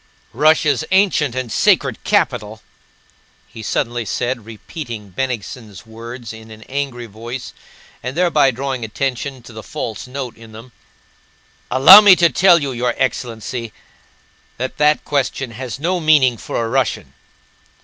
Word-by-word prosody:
"Russia's 155 0 +3
ancient 190 - +2
and 130 -3 -4
sacred - - +2
capital!" 105 +1 -1 0.8
he 110 - -11
suddenly 120 +2 -2
said, 120 +2 -3
repeating 115 - -8
Bennigsen's 110 -3 -5
words 115 +1 -9
in 110 0 -12
an 110 0 -12
angry 130 -3 -4
voice 115 +4 -8 0.5
and 130 +5 -6
thereby 170 -6 +3
drawing 130 0 -4
attention 130 +3 -4
to 120 - -13
the 110 - -8
false 110 +1 -6
note 130 -2 -6
in 115 -1 -15
them. 115 +3 -12 1.0
"Allow 140 +11 +10
me 200 -3 +8
to 170 -1 +4
tell 180 -1 +5
you, 140 -4 -2
your 120 -1 -1
excellency, 120 -2 -3 0.8
that 130 +2 -4
that 150 0 +3
question 135 -3 -2
has 125 +2 -7
no 175 +4 -1
meaning 150 -6 +4
for 115 +1 -4
a - - -3
Russian." 130 +3 -1
125 Hz, 140 wpm, -18 LUFS, 115-140 Hz, 1.0 s, Allow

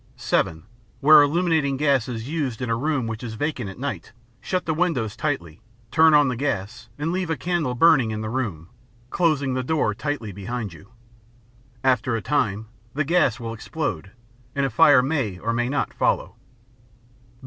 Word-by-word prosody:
(7) 80 0 -1 0.4
Where 150 +1 +8
illuminating 155 -2 +1
gas 140 -4 +2
is 115 -1 -5
used 140 -7 -2
in 125 -2 -3
a - - +2
room 140 0 -1
which 115 -1 -5
is 115 -2 -5
vacant 145 -5 -3
at 95 - -10
night, 140 0 -5 0.3
shut 185 -1 -2
the 160 - 0
windows 150 - -1
tightly, 110 - -3 0.3
turn 160 -1 +6
on 145 -1 +5
the 125 - -1
gas, 125 -2 -3
and 150 +3 -2
leave 180 -1 -2
a 160 - -1
candle 170 -7 -1
burning 135 -4 +5
in 110 0 -3
the 110 - -4
room, 100 -11 -3 0.4
closing 150 -6 +1
the 130 - -1
door 130 -5 0
tightly 145 -3 -4
behind 105 +1 -5
you. 100 +5 -15 0.9
After 125 -2 +2
a 115 - -2
time, 110 -6 0 0.3
the 155 - +1
gas 155 -8 +2
will 115 -1 -5
explode, 105 - -4 0.5
and 140 -1 +1
a 135 - -2
fire 145 +1 +6
may 130 - -1
or 115 +5 -2
may 120 +1 0
not 140 - -1
follow. - - 0
130 Hz, 175 wpm, -23 LUFS, 115-150 Hz, 0.9 s, Where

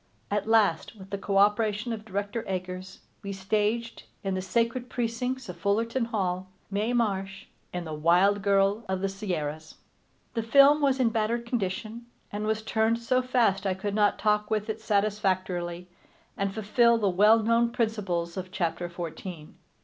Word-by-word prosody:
At 205 0 0
last, 215 -4 +2
with 195 -2 -13
the 200 - -2
cooperation 210 +3 +2
of 215 -1 -7
Director 205 +2 -3
Eggers, 185 0 -5 0.2
we 200 -2 -5
staged, 210 +4 -1 0.2
in 195 -1 -1
the 185 - -1
sacred 235 +5 -1
precincts 245 +2 -2
of 180 - -7
Fullerton 230 +4 0
Hall, 185 -4 -2 0.2
Mae 210 +4 0
Marsh 195 -5 -1 0.3
in 175 -1 -4
The 155 - -5
Wild 180 +6 +3
Girl 200 +2 +2
of 190 -1 -1
the 195 - +1
Sierras. 160 -6 -4 0.6
The 230 - -1
film 280 +6 +6
was 275 -2 +2
in 245 -3 +4
battered 225 +1 -1
condition, 230 +1 -3 0.2
and 210 +1 -3
was 220 0 -1
turned 220 +1 +1
so 255 +2 +1
fast 230 -6 +1
I 185 - 0
could 200 +2 -3
not 205 0 +3
talk 210 0 +1
with 215 0 0
it 220 0 -8
satisfactorily 185 -4 -1 0.5
and 195 0 -1
fulfil 230 +3 +3
the 210 -3 +1
well 210 +4 +5
known 230 +1 +3
principles 200 -7 -2
of 185 0 -5
chapter 175 -2 -2
fourteen. 170 -1 -7
205 Hz, 160 wpm, -27 LUFS, 190-230 Hz, 0.6 s, film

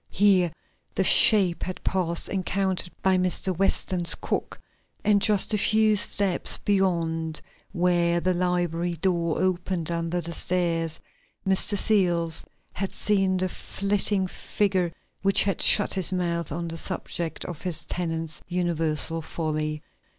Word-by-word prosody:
Here 185 -4 +3 0.4
the 190 - +1
shape 190 -3 +6
had 185 - -6
passed 170 -3 0
encountered 190 -1 -1
by 190 -1 +3
Mr. 185 +1 0
Weston's 185 -1 +1
cook, - - -4 0.4
and 205 -1 +3
just 210 +1 +2
a 210 - +1
few 215 +1 +3
steps 195 -2 +1
beyond 165 -5 -1 0.3
where 175 -2 +1
the 185 +1 0
library 175 -1 -1
door 170 -1 -1
opened 180 -2 -1
under 170 +1 -2
the 170 0 -6
stairs 165 -3 -1 0.5
Mr. 195 +2 +3
Searles 175 -6 +1 0.3
had 195 0 -4
seen 195 -2 0
the 185 0 -1
flitting 200 +1 -1
figure 185 -1 -1 0.3
which 195 0 +5
had 195 -1 -2
shut 205 - +7
his 190 -2 0
mouth 170 -3 -2
on 170 +3 -4
the 165 0 -4
subject 165 0 -3
of 175 -4 -7
his 170 -3 -5
tenants' 165 -2 -4
universal 165 -2 -1
folly. 155 -1 -4
180 Hz, 130 wpm, -25 LUFS, 170-190 Hz, 0.5 s, shut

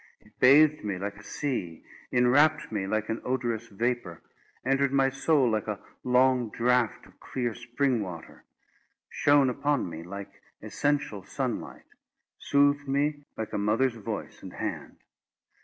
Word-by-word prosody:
It 105 - -25
bathed 150 +4 +6
me 100 -3 -2
like 100 +2 -5
a 105 - -13
sea; 105 - -4 0.3
inwrapt 145 +6 +3
me 100 -3 -2
like 110 +1 -1
an 110 - -2
odorous 120 -3 -2
vapour; 115 -5 -2 0.5
entered 135 0 +2
my 135 -1 +3
soul 135 0 +2
like 110 -1 -1
a 105 -2 -3 0.2
long 125 -1 +3
draught 120 +1 +1
of - - -21
clear 120 -3 -3
spring 120 +1 -1
water; 90 -5 -8 0.7
shone 145 -1 +4
upon 140 +1 0
me 80 -1 -7
like 100 +3 -9 0.2
essential 140 -1 -1
sunlight; 125 +4 -4 0.5
soothed 145 0 +2
me 145 +1 0
like 110 - -5
a - - -1
mother's 115 +5 +2
voice 110 -3 -6
and - - -9
hand. - - -5
125 Hz, 140 wpm, -28 LUFS, 105-140 Hz, 0.7 s, bathed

